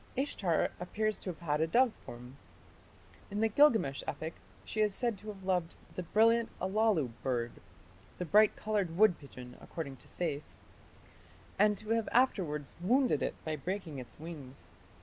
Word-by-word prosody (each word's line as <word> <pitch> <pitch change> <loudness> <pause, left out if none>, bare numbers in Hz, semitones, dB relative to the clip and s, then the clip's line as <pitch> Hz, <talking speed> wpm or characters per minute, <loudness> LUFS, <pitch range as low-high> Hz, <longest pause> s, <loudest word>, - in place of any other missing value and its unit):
Ishtar 200 - +1
appears 215 +4 -1
to - - -5
have 170 -1 -7
had 150 -2 0
a 160 - +3
dove 240 +6 +4
form. 125 +2 -10 0.9
In 205 - -3
the 225 - +4
Gilgamesh 220 - +4
epic 160 +1 -4 0.3
she 215 - -1
is 210 -2 +2
said 240 -3 0
to 215 - -13
have 200 -3 -7
loved 180 -3 0 0.2
the - - -3
"brilliant 225 +6 +3
Allalu 190 - +2
bird" 120 -3 -1 0.7
(the 180 - -3
"bright 210 +5 +5
coloured 200 -6 -1
wood 210 -3 +5
pigeon", 125 -3 -11
according 140 -5 -6
to - - -13
Sayce), 155 -4 -4 1.0
and 210 0 +5
to 215 - -10
have 225 -1 +1
afterwards 175 - +1
wounded 250 +8 +3
it - - -1
by 155 -1 -1
breaking 165 -1 -4
its 120 -3 -11
wings. 135 - -8
180 Hz, 160 wpm, -33 LUFS, 150-215 Hz, 1.0 s, bright